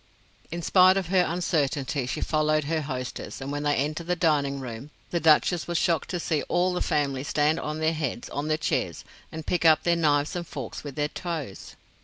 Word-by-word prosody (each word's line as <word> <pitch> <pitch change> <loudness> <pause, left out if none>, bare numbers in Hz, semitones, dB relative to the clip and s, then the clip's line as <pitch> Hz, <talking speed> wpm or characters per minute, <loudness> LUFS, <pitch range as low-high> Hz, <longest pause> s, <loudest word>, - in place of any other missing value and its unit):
In 170 +1 -5
spite 185 +1 +6
of 185 -3 -2
her 185 -1 +4
uncertainty, 150 -5 -1
she - - -3
followed 155 0 +1
her 160 +2 -1
hostess, 130 -4 -5
and 135 +1 -5
when 145 0 -2
they 145 0 +1
entered 155 +4 -2
the 180 - +1
dining 145 -5 +1
room 125 +1 -7 0.2
the 170 - +1
Duchess 160 +2 +3
was 175 -1 0
shocked 165 -3 +1
to 175 - -2
see 155 -3 0
all 180 +1 +2
the 180 - -2
family 140 -3 0
stand 150 +2 +1
on 155 +1 -4
their 160 +1 +1
heads 145 -6 -3
on 145 +1 -3
the 155 0 +1
chairs 155 - -2 0.3
and 160 -1 -7
pick 175 - 0
up 160 -2 +5
their 170 0 +3
knives 150 -2 +1
and 175 -1 -4
forks 135 -7 -6
with 145 -3 -7
their 150 0 0
toes. 160 - -6
155 Hz, 210 wpm, -26 LUFS, 145-170 Hz, 0.3 s, spite